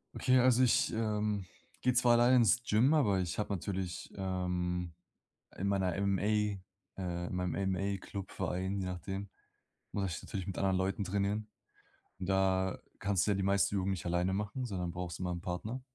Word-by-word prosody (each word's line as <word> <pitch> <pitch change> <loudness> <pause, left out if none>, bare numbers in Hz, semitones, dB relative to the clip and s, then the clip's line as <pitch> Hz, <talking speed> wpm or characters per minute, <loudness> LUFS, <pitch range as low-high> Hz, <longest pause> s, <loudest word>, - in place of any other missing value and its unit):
Okay, 130 0 +4
also 125 0 +5
ich, 120 - +3
ähm, 105 -3 0 0.4
gehe 125 - +3
zwar 120 0 +5
alleine 120 +2 +6
ins 120 +1 +4
Gym, 120 +6 +4
aber 105 -11 +3
ich 90 -1 -2
habe 105 -1 -1
natürlich, 95 -1 -4
ähm, 90 -2 -2 0.6
in 100 - -2
meiner 95 -3 +1
MMA, 100 -1 +1 0.8
äh 85 -1 -2
in - - -5
meinem 90 -1 -1
MMA 100 +1 0
Club, 95 +1 -7
Verein, 95 +2 -2
je 95 - -2
nachdem, 95 +2 -4 0.6
muss 95 -2 -1
ich - - -8
natürlich 95 -2 -5
mit 95 - -4
anderen 95 -1 +2
Leuten 95 +2 0
trainieren. 100 +3 -1 0.7
Und 95 - -4
da 95 -1 +2 0.2
kannst 100 -1 +1
du - - +3
ja - - +2
die 95 - -1
meisten 100 +1 +2
Übungen 95 0 0
nicht 95 -2 -4
alleine 90 +2 +1
machen, 105 +6 -2
sondern 90 -6 -3
brauchst 90 -2 -5
immer 90 -1 -2
'n 85 -1 -4
Partner. 105 +9 -4
95 Hz, 180 wpm, -33 LUFS, 90-105 Hz, 0.8 s, alleine